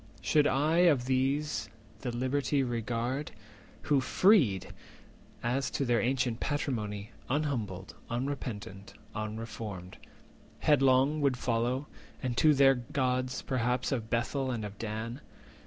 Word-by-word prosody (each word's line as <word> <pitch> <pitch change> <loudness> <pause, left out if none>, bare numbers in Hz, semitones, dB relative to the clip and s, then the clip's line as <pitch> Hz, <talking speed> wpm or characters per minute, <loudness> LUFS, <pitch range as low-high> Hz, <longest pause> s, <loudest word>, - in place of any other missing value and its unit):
Should 150 -1 +3
I 150 +5 +2
of 160 -8 +4
these 130 -3 0 0.3
the 125 - -3
liberty 135 +3 0
regard, 120 +3 -2 0.5
Who, 140 -3 +3
freed, 135 - +3 0.7
as 130 +3 0
to 140 - -1
their 120 -3 +2
ancient 125 -1 0
patrimony, 110 -7 -2 0.2
Unhumbled, 120 -10 -2 0.2
unrepentant, 120 -6 -4 0.2
unreformed, 110 -3 -6 0.6
Headlong 135 +1 +4
would 135 -3 +2
follow, 125 +3 0 0.4
and 125 -2 -1
to 155 -2 +5
their 135 0 +6
gods 125 0 -1
perhaps 125 -1 0
430 135 - +1
Of 115 -3 -5
Bethel 130 +3 0
and 115 -4 -2
of 100 -1 -9
Dan? 115 +4 -4
125 Hz, 120 wpm, -30 LUFS, 115-140 Hz, 0.7 s, their